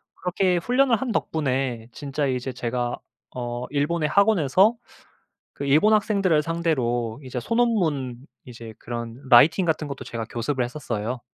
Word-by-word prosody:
그렇게 180 0 0
훈련을 250 +7 +2
한 255 +2 -3
덕분에 130 - -1
진짜 145 0 -3
이제 130 0 -2
제가 120 0 -2 0.4
어 120 0 -4
일본의 150 +2 0
학원에서 200 - +4 0.8
그 - - -5
일본 155 +10 +4
학생들을 195 -7 +2
상대로 130 -8 -1
이제 125 -1 -4
소논문 160 - 0 0.2
이제 115 -2 -10
그런 115 -1 -6
라이팅 155 +9 +6
같은 155 -2 -1
것도 140 -1 -7
제가 115 -1 -5
교습을 125 +2 -1
했었어요. 120 -3 -4
140 Hz, 310 characters per minute, -24 LUFS, 120-175 Hz, 0.8 s, 라이팅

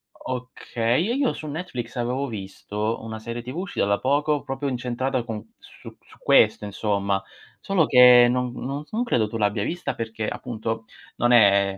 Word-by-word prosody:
Okay, 125 - -2
e - - +1
io 275 -3 +1
su 155 - -8
Netflix 145 -7 -5
avevo 125 +3 -1
visto 105 +1 -4
una 110 0 -6
serie 115 +2 -6
TV 125 +4 -8
uscita 185 - -1
da 100 0 +1
poco, 145 +2 +1
proprio 135 0 -4
incentrata 125 0 -2
con 110 -3 -7
su - - -14
su - - -20
questo 105 - +4
insomma. 100 -1 -1 0.4
Solo 185 -6 +2
che 125 -1 +8
non 125 0 0
non, 140 +4 -5
s - - -30
non 235 +3 +1
credo 115 - +1
tu 115 +2 -5
l'abbia 105 -1 0
vista 175 +9 -3
perché 110 -1 -4
appunto 115 -2 -4 0.3
non 120 +1 +2
è 100 -4 +5
120 Hz, 175 wpm, -24 LUFS, 110-135 Hz, 0.4 s, che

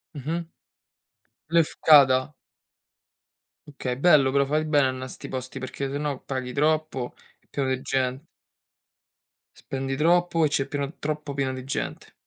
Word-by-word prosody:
Mh-mh. 160 +4 -4 1.0
Lefkada. 150 -4 +5 1.3
Okay, 125 -3 -4
bello 145 -3 +5
però. 140 0 +3
Fai 155 +3 0
bene 145 -3 +3
annà 130 0 -4
a - - -7
'sti - - -9
posti, 130 +1 -6
perché 135 +1 -4
se 140 - -3
no 145 -2 -3
paghi 130 -2 -4
troppo. 155 -3 0 0.3
È - - -37
pieno 135 -2 -1
de 130 0 -1
gente. 130 +3 -1 1.5
Spendi 135 0 -2
troppo 170 +2 +3
e - - +4
c'è 140 -2 0
pieno 140 +1 -4
troppo 150 -1 -4
pieno 135 -2 -1
di 130 - -6
gente. 135 - -5
140 Hz, 140 wpm, -25 LUFS, 130-155 Hz, 1.5 s, Lefkada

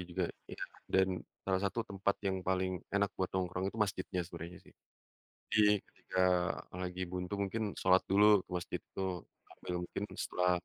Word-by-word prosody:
juga 90 0 +1 0.2
iya. - - -8 0.3
Dan 95 0 +4 0.4
salah 95 -1 +2
satu 105 +4 0
tempat 100 0 +1
yang 95 -1 +1
paling 95 -1 +1
enak 100 0 +3
buat 95 - 0
nongkrong 95 +1 -1
itu 110 - -7
masjidnya 95 -2 0
sebenarnya, 85 +1 -7
sih. - - -18 0.8
Jadi 110 -1 +6 0.2
ketika 95 0 -1 0.5
lagi 90 0 -3
buntu 90 +2 -3
mungkin 100 +3 0 0.2
sholat 95 0 +5
dulu 105 0 +6
ke - - -41
masjid 90 - -4
itu 95 -3 -3 0.2
sambil 90 - -6
mungkin 100 - -3 0.2
setelah, 90 0 +2
95 Hz, 160 wpm, -34 LUFS, 90-100 Hz, 0.8 s, Jadi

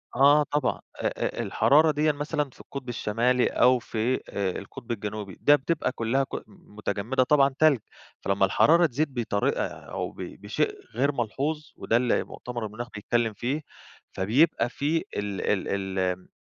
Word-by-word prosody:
آه، 145 +3 +6
طبعًا 145 -2 0 0.2
آآ - - +1
آآ، - - -2
الحرارة 155 +3 +4
ديًا 150 +1 +2
مثلًا 145 0 -2
في - - -21
القطب 135 -3 -8
الشمالي، 120 +2 +1
أو 125 0 +4
في 120 +2 -1
آآ 95 -2 -2
القطب 105 +4 -9
الجنوبي، 105 -3 -5
ده 145 - +7
بتبقى 150 0 -1
كلها 125 +2 0
ك - - -7 0.2
متجمدة 110 +5 -2
طبعًا 140 0 +3
تلج. 155 -5 +5 0.4
فلما 100 0 +2
الحرارة 170 - +5
تزيد 145 +1 -1
بطريقة 115 -5 0
أو - - -6
ب - - -22
بشيء - - -2 0.2
غير 140 +4 +2
ملحوظ، 140 +5 -2
وده 115 - +1
اللي 125 -1 +1
مؤتمر 120 -2 -6
المناخ 110 +3 -6
بيتكلم 115 +1 0
فيه، 135 +9 -2 0.5
فبيبقى 120 - +2
في 150 +6 0 0.2
ال 100 -1 -3
ال 95 -1 -1
ال 90 0 -1
125 Hz, 155 wpm, -26 LUFS, 105-145 Hz, 0.5 s, ده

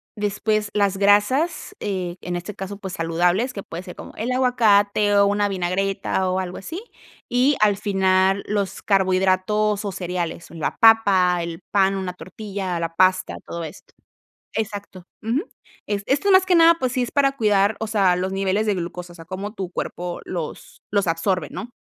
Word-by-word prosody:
después 210 0 -1
las 200 -2 +1
grasas, 255 - +2
eh, 185 -4 -3
en 175 0 -4
este 175 +4 -5
caso, 195 +1 -6
pues, 190 -2 -7
saludables, 175 +8 +1
que 200 -5 -7
puede 170 +2 -7
ser 180 -1 -10
como - - -10
el 235 +4 -3
aguacate 210 -5 +3
o 200 0 +6
una 205 0 +1
vinagreta 190 0 -1
o 185 - 0
algo 180 -1 -4
así, 335 - -7 0.5
y 255 +4 +3
al 205 -2 +4
final 190 -1 +2
los 200 -2 -2
carbohidratos 195 +2 +2
o 200 - -3
cereales, 175 -2 -4
una 165 -2 -3
papa, 195 -6 +5
el 170 -1 -6
pan, 195 -1 +3
una 190 -2 -3
tortilla, 190 -2 -5
la 165 0 -3
pasta, 185 +1 +2
todo 170 0 -5
esto. 155 -1 -10 0.6
Exacto. 205 -4 -5 0.2
Ujú. 240 - -1 0.4
Es 200 -1 -2
esto 290 +9 +2
más 375 0 +6
que 370 -1 +3
nada, 335 0 +7
pues 255 -1 0
sí 255 - 0
es 245 - -2
para 275 -1 +3
cuidar, 205 -2 +2
o 220 - -3
sea, 195 -4 +3
los 185 +1 -2
niveles 195 +2 0
de 210 -2 +1
glucosa, 175 0 -6
o - - -15
sea, 165 -2 -12
cómo 195 +4 -6
tu 190 -5 -5
cuerpo 175 -1 -4
los 170 -4 -6
los 200 -2 +1
absorbe, 165 0 0
¿no? 240 - -7
195 Hz, 180 wpm, -22 LUFS, 185-215 Hz, 0.6 s, nada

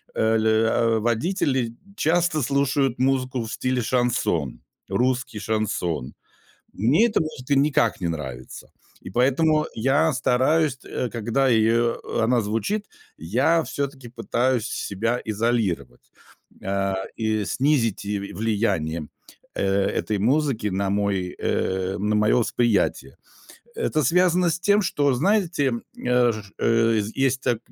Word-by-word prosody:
э, - - -1 0.2
л 110 - -1
э, 110 +1 +2
водители 120 - 0 0.2
часто 170 -2 +1
слушают 135 -1 0
музыку 130 -2 0
в 110 - -7
стиле 130 -1 -1
шансон, 110 - 0 0.3
русский 125 -3 -1
шансон. 95 - -2 0.6
Мне 135 - +3
это 220 - +1
может 150 -4 -6
и 140 - +5
никак 135 -7 +2
не 85 - 0
нравится, 65 -7 -7 0.4
и - - -6
поэтому 155 +6 +2
я 140 +7 +2
стараюсь, 130 +3 +1
э, 125 - -3
когда, 120 +4 0
э, 115 +1 +2 0.3
она 120 +1 +2
звучит, 115 - -2 0.3
я 130 - +1
всё 140 -2 -2
таки 135 -3 -13
пытаюсь 125 0 -1 0.2
себя 115 +5 -1
изолировать, 110 - -2 0.5
э, 100 0 -1 0.2
и 110 -2 -1
снизить 120 - 0
и 105 0 -2
в 100 0 -8
влияние, 95 -8 -1 0.5
э, 100 0 +1 0.2
этой 105 -2 -2
музыки 125 -2 +1
на 95 +1 -1
мой, 100 -2 -1
э, 95 0 -1
на 105 +1 0
мое 105 0 +3
восприятие. 120 -2 0 0.6
Это 165 - 0
связано 180 +3 +3
с 165 - -1
тем, 205 +1 +3
что 145 -6 +1
знаете, 175 - +1 0.2
э, 125 -1 +2
ж 105 -2 -9
э, 115 -1 +2 0.2
есть, 130 -1 -1
так 120 - 0
120 Hz, 130 wpm, -23 LUFS, 105-140 Hz, 0.6 s, и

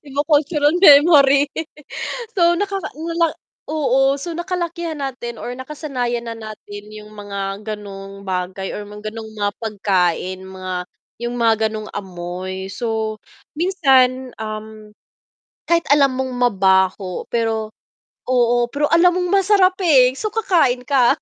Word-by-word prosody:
Iba 280 +1 -2
cultural 295 0 +2
memory. 285 -3 +7 0.9
So, 345 -2 +4
nakaka 395 -1 -2
ano 325 +3 -5
lang 335 -2 +3 0.4
oo, 275 -2 +2
so 330 +4 -5
nakalakihan 345 -2 -3
natin 255 -4 -5
or 245 - -5
nakasanayan 255 -3 -4
na 230 - -4
natin 210 -1 -10
yung 215 0 -11
mga 200 -1 -5
ganong 200 -2 -8
bagay 185 +1 -3
or 210 - -5
mga 210 +1 -7
ganong 220 -1 -7
mga 205 -1 -1
pagkain, 185 -3 0
mga 185 -1 -6 0.5
yung 240 0 -3
mga 230 -1 +4 0.2
ganong 215 -1 -6
amoy. 185 0 -6
So, 220 -1 -3 0.4
minsan, 265 -7 +2
um, 215 0 -7 0.8
kahit 340 0 +2
alam 280 -2 +4
mong 260 -1 -2
mabaho 190 -5 +2
pero 225 -2 -1 0.6
oo, 240 -1 +2
pero 290 +3 0
alam 355 +1 +5
mong 360 -1 -1
masarap 380 -2 +4
eh, 260 -6 +5
so 430 - -2
kakain 300 - +2
ka. 270 -1 +4
240 Hz, 130 wpm, -20 LUFS, 205-295 Hz, 0.9 s, memory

